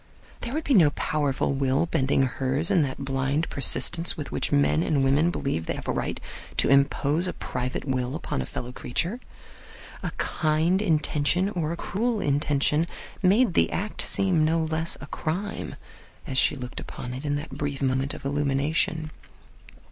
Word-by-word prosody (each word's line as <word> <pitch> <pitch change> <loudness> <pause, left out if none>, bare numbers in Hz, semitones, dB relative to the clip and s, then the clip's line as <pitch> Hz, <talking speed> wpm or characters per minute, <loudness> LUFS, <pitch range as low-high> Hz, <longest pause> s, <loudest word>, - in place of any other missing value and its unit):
There 240 +3 -5
would 315 - -1
be 280 - +1
no 170 -10 +7
powerful 145 -2 0
will 135 +2 +1
bending 135 -4 +1
hers 135 +4 0
in 175 - +4
that 140 -1 -3
blind 135 +4 0
persistence 170 +6 +2
with 150 - -6
which - - -1
men 75 +2 +3
and 135 - +1
women 140 +5 +3
believe 135 - -2
they - - -1
have - - -8
a - - +1
right - - -2 0.4
to - - +3
impose 140 +4 +3
a - - -2
private 125 +1 -4
will 130 -1 -1
upon 155 - -3
a 65 - -5
fellow 125 - -5
creature. 175 - -2 0.8
A - - -2
kind 160 +4 +1
intention 160 0 +2
or 170 -6 -2
a 170 - -3
cruel 225 +5 -1
intention 145 +2 +1 0.3
made 200 +2 +4
the - - +3
act 210 +3 -3
seem 185 -5 +2
no 160 +1 +2
less 160 +1 0
a - - -6
crime 180 +8 -4 0.5
as 135 -6 +1
she - - +5
looked 125 -2 -6
upon 125 - -7
it 130 +3 -6
in 145 -1 0
that 145 +2 -5
brief 145 -2 -2
moment 135 0 0
of - - -11
illumination. 145 +3 0
150 Hz, 170 wpm, -26 LUFS, 135-170 Hz, 0.8 s, no